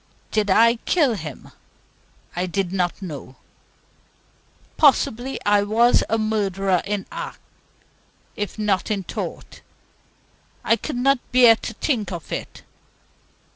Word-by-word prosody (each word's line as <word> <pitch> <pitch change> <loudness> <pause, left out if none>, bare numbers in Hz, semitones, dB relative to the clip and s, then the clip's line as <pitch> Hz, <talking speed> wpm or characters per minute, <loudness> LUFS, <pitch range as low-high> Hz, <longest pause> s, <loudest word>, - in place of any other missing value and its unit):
Did 215 -2 0
I 230 +4 +5
kill 285 0 +2
him? 155 - -8 0.8
I 180 +1 -1
did 190 0 -2
not 180 +1 -1
know. 145 -6 -8 1.4
Possibly 265 -3 +2
I 205 0 +4
was 225 +4 +3
a 225 - +2
murderer 195 -4 0
in 200 -1 -2
act, - - -6 1.0
if 205 +1 -4
not 210 -3 0
in 200 -3 -1
thought. - - -7 1.0
I 230 - +3
could 275 +5 -5
not 270 +1 +3
bear 245 -3 +7
to 225 - -6
think 220 -7 -1
of 170 -3 -7
it. - - -6
210 Hz, 120 wpm, -22 LUFS, 190-235 Hz, 1.4 s, bear